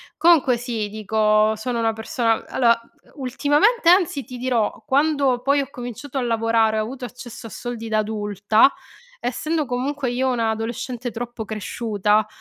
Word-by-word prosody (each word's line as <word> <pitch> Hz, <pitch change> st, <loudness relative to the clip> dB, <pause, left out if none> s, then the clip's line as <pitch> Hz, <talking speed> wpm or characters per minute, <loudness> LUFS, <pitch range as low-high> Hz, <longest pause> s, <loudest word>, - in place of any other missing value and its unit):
Comunque 310 Hz, -7 st, +4 dB
sì, 230 Hz, -3 st, -3 dB
dico, 215 Hz, +1 st, +2 dB
sono 235 Hz, +2 st, -3 dB
una 225 Hz, -1 st, +2 dB
persona 225 Hz, 0 st, -1 dB
allora, 235 Hz, -2 st, +3 dB, 0.4 s
ultimamente 295 Hz, -, +2 dB
anzi 345 Hz, -7 st, +3 dB
ti 250 Hz, -2 st, -9 dB
dirò, 240 Hz, -4 st, -1 dB
quando 280 Hz, -3 st, +2 dB
poi 280 Hz, +2 st, +2 dB
ho 270 Hz, -, -6 dB
cominciato 250 Hz, +3 st, -6 dB
a -, -, -1 dB
lavorare 225 Hz, -2 st, +2 dB
ho 215 Hz, -, +1 dB
avuto 250 Hz, +3 st, -6 dB
accesso 240 Hz, -2 st, -9 dB
a -, -, -10 dB
soldi 235 Hz, -1 st, -6 dB
da 215 Hz, -, +1 dB
adulta, 210 Hz, +2 st, +2 dB, 0.5 s
essendo 305 Hz, +6 st, -1 dB
comunque 260 Hz, +1 st, -2 dB
io 260 Hz, +1 st, 0 dB
una 230 Hz, -3 st, +1 dB
adolescente 235 Hz, +2 st, -4 dB
troppo 240 Hz, 0 st, -6 dB
cresciuta, 215 Hz, 0 st, 0 dB
240 Hz, 150 wpm, -22 LUFS, 220-265 Hz, 0.5 s, Comunque